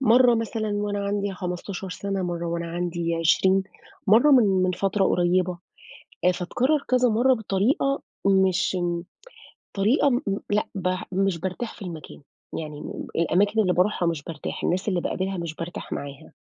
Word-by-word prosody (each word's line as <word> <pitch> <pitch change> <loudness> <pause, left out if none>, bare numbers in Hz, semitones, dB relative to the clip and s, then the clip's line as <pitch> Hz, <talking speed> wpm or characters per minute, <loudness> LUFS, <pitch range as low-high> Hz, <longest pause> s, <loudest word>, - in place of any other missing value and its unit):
مرّة 245 -1 +5
مثلًا 225 -1 -2
وأنا 205 -1 -2
عندي 200 0 -1
15 180 +1 -5
سَنة، 195 0 -3
مرّة 170 -1 -3
وأنا 170 0 -2
عندي 170 0 -2
20 185 +3 +3 0.4
مرّة 230 +9 +6
من 200 -8 +5
من 185 - +2
فترة 195 +2 0
قريبة. 180 0 +1 0.7
آآ 180 - +5
فاتكرر 255 - 0
كذا 250 -1 +4
مرّة 245 +4 +4
بطريقة 225 +6 0 0.2
مش 190 -1 +3
م 175 -1 -1 0.7
طريقة 225 +8 +3
م 245 - +1 0.3
لأ 210 +1 +1
ب 185 -2 -1 0.2
مش 195 -2 +1
بارتاح 190 +6 -4
في 215 - -12
المكان. 165 -5 -8 0.4
يعني 150 -2 -6 0.3
الأماكن 200 +6 +2
اللي 185 -3 +3
بارُوحها 180 -1 +1
مش 160 -4 -2
بارتاح، 160 -3 -6
الناس 185 +4 0
اللي 185 -3 +1
باقابلها 190 +2 -2
مش 170 -2 -4
بارتاح 170 +2 -7
معاها. 140 -1 -6
190 Hz, 155 wpm, -25 LUFS, 175-210 Hz, 0.7 s, مرّة